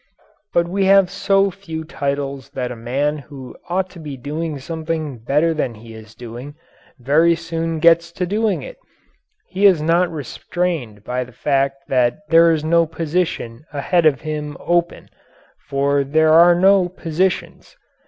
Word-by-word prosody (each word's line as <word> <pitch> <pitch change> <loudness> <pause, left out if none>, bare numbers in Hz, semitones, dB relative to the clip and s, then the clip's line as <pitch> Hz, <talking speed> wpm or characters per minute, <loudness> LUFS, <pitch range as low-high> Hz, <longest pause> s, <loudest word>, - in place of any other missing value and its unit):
But 170 0 +1
we 195 +2 0
have 195 -1 +5
so 195 0 +2
few 165 -4 -7
titles 140 -3 -4
that 125 -1 -3
a - - -6
man 140 +6 -2
who 135 -3 -11
ought 185 +2 0
to 175 - -12
be 150 -4 -7
doing 150 +4 -4
something 155 -2 -4
better 150 +8 +1
than 130 -7 -2
he 115 +1 -13
is 110 0 -13
doing, 120 +4 -9 0.4
very 155 +6 +3
soon 165 0 -3
gets 170 +1 +4
to 180 - -2
doing 210 +2 -1
it - - -10 0.7
he 195 +2 +3
is 185 -5 +4
not 170 +3 +2
restrained 150 - -4
by 125 +3 -2
the 125 - -14
fact 135 +1 -1
that 125 0 +1
there 165 0 +6
is 155 -2 0
no 165 +1 +3
position 160 -6 -3
ahead 160 +4 +2
of 140 -4 +1
him 150 -1 -5
"open" 175 0 -1 0.6
for 140 0 +1
there 155 +3 +3
are 170 +2 +7
no 190 0 +4
"positions." 185 - -3
160 Hz, 155 wpm, -19 LUFS, 140-170 Hz, 0.7 s, are